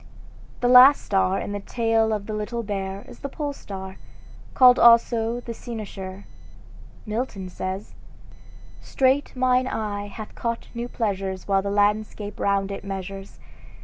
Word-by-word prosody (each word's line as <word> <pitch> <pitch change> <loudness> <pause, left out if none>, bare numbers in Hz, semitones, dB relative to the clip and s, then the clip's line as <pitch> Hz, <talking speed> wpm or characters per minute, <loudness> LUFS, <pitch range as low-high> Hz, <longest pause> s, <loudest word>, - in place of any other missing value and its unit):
The 245 - +2
last 255 +3 +8
star 190 -1 +1
in - - -4
the 205 - -3
tail 225 +1 +1
of 210 -2 -2
the 215 - -5
Little 225 +3 -3
Bear 195 -1 -4
is - - -13
the 280 - -5
Pole 290 0 -4
star, 190 -6 -8 0.6
called 250 -1 +7
also 235 0 +4
the 235 - -6
Cynosure. 200 -5 -7 0.8
Milton 215 -4 -4
says: 185 +2 -5 0.9
"Straight 270 +2 +1
mine 255 0 +2
eye 205 -4 -3
hath 215 +1 -9
caught 235 -1 -4
new 235 0 -4
pleasures 195 -5 -3
While 195 -1 +2
the 200 - -3
landscape 205 0 0
round 200 0 0
it 195 - -6
measures. 195 0 -7
210 Hz, 145 wpm, -24 LUFS, 195-235 Hz, 0.9 s, last